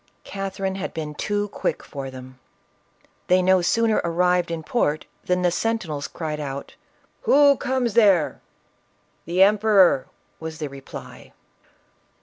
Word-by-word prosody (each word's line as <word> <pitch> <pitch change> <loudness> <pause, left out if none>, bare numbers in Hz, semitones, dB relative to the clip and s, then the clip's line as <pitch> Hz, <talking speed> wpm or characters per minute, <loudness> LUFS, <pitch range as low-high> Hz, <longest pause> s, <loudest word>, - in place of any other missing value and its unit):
Catherine 195 -1 -4
bad 190 -1 -5
been 155 -2 -4
too 205 +6 -2
quick - - -3
for 135 -2 -7
them. 130 0 -11 0.9
They 185 0 +4
no 185 0 +4
sooner 225 +5 +2
arrived 180 +1 +1
in 165 -1 -4
port 155 -7 0 0.2
than 180 0 0
the 175 - +3
sentinels 175 -9 -2
cried 155 -2 -5
out, 140 -1 -6 0.3
" - - -39
Who 285 -4 +6
comes 255 -4 -1
there 200 -8 +3 0.3
?" - - -42
" - - -42
The 180 +3 +4
emperor," 200 -7 +4 0.3
was 160 -1 -6
the 150 -2 -4
reply. 135 0 -11
180 Hz, 140 wpm, -23 LUFS, 155-205 Hz, 0.9 s, Who